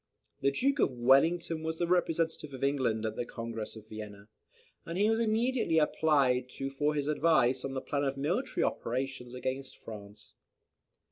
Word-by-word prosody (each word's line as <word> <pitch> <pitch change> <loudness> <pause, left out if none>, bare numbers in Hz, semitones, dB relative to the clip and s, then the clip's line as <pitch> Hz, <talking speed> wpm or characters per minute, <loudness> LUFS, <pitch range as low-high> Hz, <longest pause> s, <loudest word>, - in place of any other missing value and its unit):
The 140 - +4
Duke 275 - +1
of - - +4
Wellington 155 +7 +3
was 160 0 -3
the 175 - +1
representative 165 -4 0
of 130 - -7
England 130 -6 +1
at 110 - -2
the - - -2
Congress 115 -2 -6
of 110 -1 -12
Vienna, 105 -1 -9 0.5
and 165 +1 -5
he 205 +2 +3
was 225 - +1
immediately 230 -4 +1
applied 140 -5 +3
to 135 0 -3
for 150 +2 0
his 145 -1 -1
advice 150 -5 +3
on 135 0 -4
the 130 - -2
plan 145 -1 -1
of 135 0 -1
military 180 - 0
operations 125 0 -3
against 130 +1 -4
France. 105 -1 -10
135 Hz, 165 wpm, -31 LUFS, 125-165 Hz, 0.5 s, The